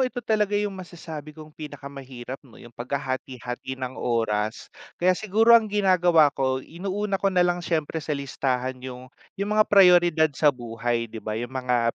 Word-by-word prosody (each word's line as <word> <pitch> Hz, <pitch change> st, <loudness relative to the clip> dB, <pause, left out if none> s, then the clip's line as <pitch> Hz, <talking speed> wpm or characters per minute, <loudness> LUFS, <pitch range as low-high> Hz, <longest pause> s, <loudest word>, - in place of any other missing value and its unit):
ito 255 Hz, -1 st, -2 dB
talaga 210 Hz, -3 st, +1 dB
yung 205 Hz, -1 st, -2 dB
masasabi 165 Hz, -5 st, -8 dB
kong 155 Hz, -1 st, -12 dB
pinakamahirap 135 Hz, -4 st, -8 dB
'no, 130 Hz, -5 st, -17 dB
yung 120 Hz, 0 st, -14 dB
paghahati-hati 130 Hz, 0 st, -5 dB
ng 130 Hz, 0 st, -5 dB
oras. 110 Hz, -2 st, -1 dB, 0.3 s
Kaya 185 Hz, +1 st, +3 dB
siguro 220 Hz, +4 st, +4 dB
ang 225 Hz, -2 st, +4 dB
ginagawa 180 Hz, -7 st, +4 dB
ko, 130 Hz, -1 st, 0 dB
inuuna 195 Hz, +4 st, -3 dB
ko 200 Hz, -, +3 dB
na 180 Hz, -2 st, +3 dB
lang 175 Hz, 0 st, 0 dB
siyempre 160 Hz, -1 st, -2 dB
sa 155 Hz, -, -7 dB
listahan 130 Hz, -2 st, -2 dB
yung 130 Hz, -1 st, -8 dB, 0.3 s
yung 200 Hz, +1 st, -2 dB
mga 215 Hz, 0 st, +5 dB
prayoridad 175 Hz, -5 st, +6 dB
sa 150 Hz, +1 st, +4 dB
buhay 120 Hz, -2 st, -3 dB
'di 110 Hz, 0 st, -9 dB
ba, 110 Hz, 0 st, -3 dB
yung 120 Hz, +2 st, -5 dB
mga 125 Hz, -3 st, 0 dB
145 Hz, 165 wpm, -25 LUFS, 125-185 Hz, 0.3 s, prayoridad